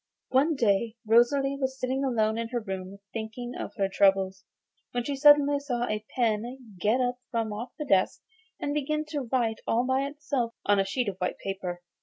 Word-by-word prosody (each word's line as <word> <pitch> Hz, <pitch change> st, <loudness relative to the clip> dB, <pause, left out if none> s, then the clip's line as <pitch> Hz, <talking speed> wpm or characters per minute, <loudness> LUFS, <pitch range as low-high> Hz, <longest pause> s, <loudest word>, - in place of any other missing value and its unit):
One 285 Hz, +5 st, +3 dB
day 225 Hz, -2 st, +1 dB
Rosalie 270 Hz, +5 st, +4 dB
was 265 Hz, -1 st, -2 dB
sitting 260 Hz, +2 st, -1 dB
alone 220 Hz, -5 st, +1 dB
in 230 Hz, -, -2 dB
her 240 Hz, +1 st, -2 dB
room 190 Hz, -2 st, -6 dB, 0.2 s
thinking 230 Hz, +2 st, -5 dB
of -, -, -6 dB
her 195 Hz, -3 st, +1 dB
troubles 190 Hz, -1 st, +2 dB, 0.5 s
when 245 Hz, -1 st, 0 dB
she 280 Hz, +3 st, -2 dB
suddenly 290 Hz, 0 st, +6 dB
saw 250 Hz, -4 st, -2 dB
a 215 Hz, -2 st, -2 dB
pen 235 Hz, -1 st, -1 dB
get 215 Hz, +6 st, +2 dB
up 250 Hz, 0 st, 0 dB
from 225 Hz, -3 st, -1 dB
off 230 Hz, +4 st, -6 dB
the 300 Hz, -, -4 dB
desk 195 Hz, -8 st, +2 dB, 0.4 s
and 285 Hz, -, -2 dB
begin 305 Hz, +1 st, -1 dB
to 280 Hz, -6 st, -3 dB
write 230 Hz, -4 st, +1 dB
all 235 Hz, +2 st, +2 dB
by 260 Hz, +2 st, +1 dB
itself 280 Hz, -5 st, -2 dB
on 205 Hz, -1 st, +4 dB
a 195 Hz, -, +2 dB
sheet 240 Hz, +5 st, -1 dB
of 195 Hz, -2 st, -3 dB
white 180 Hz, -1 st, -2 dB
paper. 185 Hz, -2 st, -5 dB
240 Hz, 190 wpm, -28 LUFS, 210-270 Hz, 0.5 s, suddenly